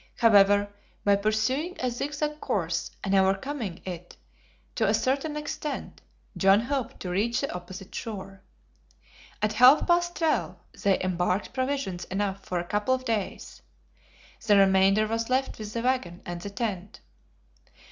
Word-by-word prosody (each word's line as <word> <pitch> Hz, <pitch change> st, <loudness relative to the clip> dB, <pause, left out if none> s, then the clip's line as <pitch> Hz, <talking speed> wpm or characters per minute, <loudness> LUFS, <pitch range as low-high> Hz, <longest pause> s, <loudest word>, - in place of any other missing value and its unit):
However, 205 Hz, -2 st, +5 dB, 0.3 s
by 200 Hz, 0 st, +4 dB
pursuing 220 Hz, -, 0 dB
a 255 Hz, -1 st, 0 dB
zigzag 295 Hz, +4 st, -3 dB
course, 170 Hz, -3 st, -1 dB
and 195 Hz, -, -1 dB
overcoming 195 Hz, +1 st, 0 dB
it 175 Hz, -1 st, -7 dB, 0.6 s
to -, -, +1 dB
a -, -, +3 dB
certain 285 Hz, +3 st, -1 dB
extent, 300 Hz, -1 st, -5 dB, 0.3 s
John 195 Hz, +2 st, +5 dB
hoped 265 Hz, +1 st, -3 dB
to 180 Hz, -, -4 dB
reach 220 Hz, +6 st, 0 dB
the 275 Hz, -, -3 dB
opposite 185 Hz, +2 st, -9 dB
shore. 195 Hz, -4 st, -6 dB, 1.0 s
At 215 Hz, 0 st, +2 dB
half 250 Hz, +6 st, +7 dB
past 345 Hz, 0 st, +2 dB
twelve, 320 Hz, -2 st, 0 dB, 0.3 s
they 200 Hz, -2 st, +3 dB
embarked 180 Hz, +3 st, -1 dB
provisions 260 Hz, -9 st, -2 dB
enough 195 Hz, 0 st, -2 dB
for 180 Hz, -, -3 dB
a 175 Hz, -, -1 dB
couple 210 Hz, +7 st, +1 dB
of 255 Hz, 0 st, -8 dB
days. 220 Hz, -5 st, -3 dB, 0.9 s
The 205 Hz, -2 st, +6 dB
remainder 195 Hz, +2 st, +5 dB
was 225 Hz, +2 st, -2 dB
left 260 Hz, -1 st, 0 dB
with 210 Hz, -1 st, -6 dB
the 230 Hz, +1 st, -3 dB
wagon 245 Hz, -9 st, -1 dB
and 175 Hz, 0 st, -5 dB
the 200 Hz, -, -5 dB
tent. 200 Hz, -3 st, -4 dB
210 Hz, 145 wpm, -27 LUFS, 190-260 Hz, 1.0 s, half